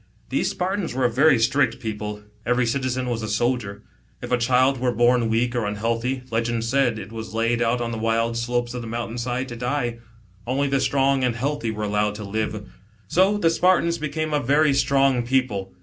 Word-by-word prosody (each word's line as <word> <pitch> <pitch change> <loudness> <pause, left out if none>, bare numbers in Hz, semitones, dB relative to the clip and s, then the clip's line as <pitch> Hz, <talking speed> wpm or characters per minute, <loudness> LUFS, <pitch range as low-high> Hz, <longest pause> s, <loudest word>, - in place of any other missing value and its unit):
These - - 0
Spartans 185 -6 -2
were 130 -1 +1
a 120 - +2
very 135 +3 +5
strict 115 +1 +1
people, 105 -1 -5 0.2
every 125 +1 +1
citizen 130 +1 -1
was 120 -2 -2
a 110 - -4
soldier. 105 -2 -1 0.4
If - - -7
a 125 - +4
child 130 +2 +3
were 125 0 +1
born 120 0 +3
weak 120 +2 0
or 115 -4 0
unhealthy, 115 +5 -2
legend 115 0 0
said, 120 -1 +1
it 110 - -8
was 110 -1 -7
laid 115 +1 +1
out 120 +1 +1
on 115 -1 -2
the 115 - -4
wild 115 +1 0
slopes 120 +1 -1
of 125 - -4
.the 115 - -7
mountain 115 +1 -4
side 125 +2 -2
to 120 - -6
die. 120 -1 -2 0.5
Only 135 +3 +1
the 135 0 +1
strong 135 0 +2
and 125 -2 +1
healthy 140 0 -2
were 105 -1 -4
allowed 105 0 0
to 105 - -6
live. 105 0 -3 0.4
So 190 - +3
the 165 -5 +2
Spartans 170 -1 +2
became 155 +1 -3
a 150 - +3
very 145 +3 +3
strong 135 -2 +3
people. 120 -6 -1
120 Hz, 200 wpm, -23 LUFS, 115-135 Hz, 0.5 s, very